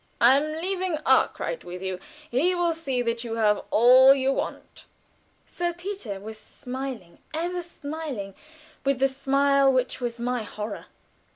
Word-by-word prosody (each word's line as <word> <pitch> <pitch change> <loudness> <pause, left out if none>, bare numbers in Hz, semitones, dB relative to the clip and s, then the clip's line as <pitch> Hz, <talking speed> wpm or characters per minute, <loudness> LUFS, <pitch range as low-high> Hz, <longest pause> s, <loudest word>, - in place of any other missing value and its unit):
I 245 +3 +7
am 310 +2 -2
leaving 370 -1 -1
Arkwright - - +2
with 180 +1 -8
you. 190 -1 -3 0.3
He 325 +10 +2
will 345 -1 +1
see 270 -6 -2
that 230 0 -2
you 230 -1 -4
have 210 -2 +2
all 255 +4 +7
you 270 0 +1
want." - - -6 0.6
Sir 345 0 -3
Peter 350 - -6
was 220 +2 -9
smiling, 250 -8 -7 0.2
ever 350 +2 -2
smiling, 295 - -6 0.5
with 275 -1 +1
the 270 +1 +3
smile 275 +1 +3
which 255 0 -1
was 240 -1 -3
my 245 0 -1
horror. 210 0 -6
265 Hz, 150 wpm, -25 LUFS, 230-315 Hz, 0.6 s, I